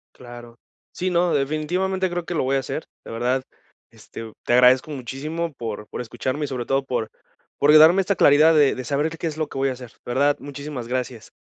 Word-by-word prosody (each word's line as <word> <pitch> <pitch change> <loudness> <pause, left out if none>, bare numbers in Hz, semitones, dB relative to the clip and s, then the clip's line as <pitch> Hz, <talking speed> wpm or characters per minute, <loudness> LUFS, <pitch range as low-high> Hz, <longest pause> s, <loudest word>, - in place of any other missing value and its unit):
Claro. 120 -1 -12 0.3
Sí, 185 +1 -2
no, 175 -1 +2
definitivamente 175 +7 0
creo 175 -1 -3
que 175 - -5
lo - - +1
voy 135 +1 0
a 135 - +2
hacer, 135 +4 -5 0.2
de - - -10
verdad, 125 +3 0 0.5
este, 115 -1 -10
te - - +1
agradezco 125 +4 +5
muchísimo 150 +5 -4
por 110 -4 -6
por - - -6
escucharme 130 +5 -3
y - - -5
sobre 125 -2 -5
todo 135 0 +1
por 115 -4 -2 0.5
por 145 +1 +4
de 155 - +9
darme 170 +5 +7
esta 195 +1 0
claridad, 155 +2 +6
de 150 -3 +4
de 130 - -5
saber 145 +5 0
que 165 - -9
qué - - -5
es 155 -1 -5
lo 155 - -1
que - - -8
voy 135 0 +1
a - - -1
hacer, 125 -1 -11 0.2
de 120 - -4
verdad, 145 +2 +2
muchísimas 140 -3 -7
gracias. 125 -2 -4
140 Hz, 225 wpm, -22 LUFS, 125-155 Hz, 0.5 s, de